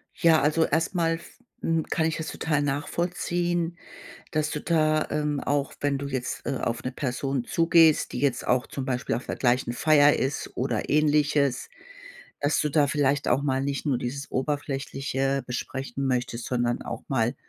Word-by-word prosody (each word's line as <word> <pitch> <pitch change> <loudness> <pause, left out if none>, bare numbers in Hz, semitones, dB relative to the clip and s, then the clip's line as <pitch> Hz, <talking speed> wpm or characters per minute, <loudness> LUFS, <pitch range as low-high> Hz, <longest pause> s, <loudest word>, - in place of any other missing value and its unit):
Ja, 165 -2 +4
also, 155 +3 +3
erst 165 +3 0
mal 165 -1 +2
f 170 - -13 0.2
hm, 165 -1 0
kann 160 - +1
ich 160 - 0
das 160 - -4
total 150 -3 -1
nachvollziehen, 175 +3 -1 0.6
dass 155 -1 0
du 150 - -3
da, 155 -2 +2
ähm, 150 -1 -1
auch 145 -1 -1
wenn 145 -1 0
du 140 - -4
jetzt, 130 -2 -4
äh, 135 - -1
auf 115 0 -2
'ne 130 - -1
Person 130 -1 -2
zugehst, 165 0 +4
die - - -3
jetzt 135 -4 0
auch 125 0 +2
zum 135 - -5
Beispiel 130 0 -1
auf 125 - -4
der - - -3
gleichen 120 -1 +1
Feier 145 +2 +5
ist 135 +2 -2
oder - - -1
Ähnliches 145 -3 +2 0.7
dass 145 +2 +2
du 150 - 0
da 145 -1 +3
vielleicht 145 -1 +1
auch 130 +3 +3
mal 135 -2 0
nicht 140 +2 -2
nur 135 -4 +1
dieses 140 +4 -5
Oberflächliche 135 -1 -2
besprechen 135 +2 -4
möchtest, 125 -2 -1
sondern 120 -1 0
auch - - -6
mal, 120 -3 +1
145 Hz, 175 wpm, -26 LUFS, 130-155 Hz, 0.7 s, Feier